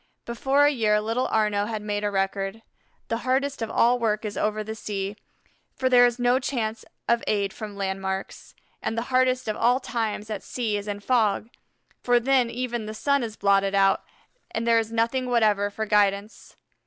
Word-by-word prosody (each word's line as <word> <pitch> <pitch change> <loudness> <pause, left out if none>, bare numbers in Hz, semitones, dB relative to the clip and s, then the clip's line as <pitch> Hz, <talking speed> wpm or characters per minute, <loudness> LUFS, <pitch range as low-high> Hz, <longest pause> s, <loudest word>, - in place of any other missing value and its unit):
Before 270 +4 +2
a 290 - +5
year 215 -5 +2
little 225 +4 -1
Arnaux 210 -2 +1
had 215 -2 -4
made 205 0 -2
a 205 - +1
record. 195 +2 -2 0.5
The 230 - 0
hardest 265 +2 -1
of 225 - -2
all 245 +1 +3
work 215 -2 0
is 210 - -4
over 215 0 -1
the 220 +1 -5
sea, 200 -2 -4 0.6
for 260 - 0
there 245 -1 +7
is 240 0 -3
no 245 +1 +3
chance 230 -5 -3 0.2
of 235 0 +2
aid 200 -2 0
from 210 -2 -7
landmarks; 190 0 -4 0.3
and 225 - -3
the 245 +3 -4
hardest 255 -1 +2
of 215 - -1
all 245 +3 +3
times 220 -4 -3
at 205 -3 -3
sea 225 -2 -2
is 205 0 -4
in 205 0 -4
fog, 225 -1 +1 0.5
for 245 -1 +3
then 255 -1 +2
even 240 -2 -3
the 215 - -6
sun 280 +5 +1
is 225 -2 -4
blotted 195 0 +2
out 195 0 +3 0.5
and 225 - -3
there 230 -1 +4
is 225 0 -3
nothing 235 +3 0
whatever 210 -4 +2
for 220 +2 -4
guidance. 205 0 0
220 Hz, 190 wpm, -25 LUFS, 205-245 Hz, 0.6 s, there